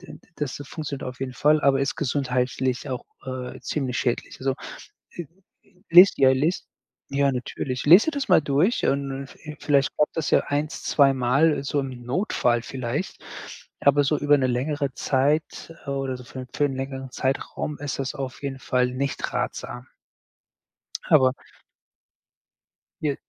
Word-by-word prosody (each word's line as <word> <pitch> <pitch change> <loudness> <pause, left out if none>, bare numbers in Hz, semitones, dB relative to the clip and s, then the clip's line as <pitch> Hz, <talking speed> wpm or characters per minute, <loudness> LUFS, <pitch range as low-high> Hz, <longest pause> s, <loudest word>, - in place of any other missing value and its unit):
d - - -15 0.2
das 145 -3 -3
das 145 - -9
funktioniert 150 -2 -6
auf 125 0 -8
jeden 130 -1 -3
Fall, 150 +4 +3
aber 135 -1 +3
ist 140 - -1
gesundheitlich 130 -1 -1
auch, 130 -1 -4 0.2
äh, 130 -1 -6
ziemlich 130 -5 -2
schädlich. 120 -2 -2
Also, 135 0 0 0.6
äh, 175 - -3 0.4
äh, 180 - -29
lies 180 +4 +9
ja, 135 -1 +6
lies 150 +7 0 0.5
Ja, 140 0 +2
natürlich. 130 0 -4
Lese 180 - +8
dir 320 - 0
das 285 -2 -3
mal - - +7
durch 150 - +1
und 140 0 0
und 135 0 -6
vi 150 -1 -10
vielleicht 140 -2 +2
klappt 150 - +1
das 160 - -1
ja - - +5
1, 150 +2 -3
2 140 -2 +4
Mal 135 +4 +2
so 140 +1 -1
im 130 -3 -7
Notfall 125 - +1
vielleicht, 130 +7 -4 0.6
aber 145 +1 +4
so 145 +2 +1
über 145 0 +4
'ne 135 - +1
längere 140 +2 -1
Zeit 145 +6 0
oder 135 -1 -2
so 125 - -11
für 130 - -9
'n 130 - -9
für 145 - +2
'n 135 -2 -2
längeren 135 0 -5
Zeitraum 135 +3 -2
ist 145 -1 -4
das 135 -1 -2
auf 135 0 -6
jeden 135 -1 -4
Fall 125 -1 +1
nicht 135 +1 -3
ratsam. 125 +1 -4 1.2
Aber 130 -4 +5 1.7
Ja. 145 -3 0
135 Hz, 165 wpm, -24 LUFS, 130-145 Hz, 1.7 s, lies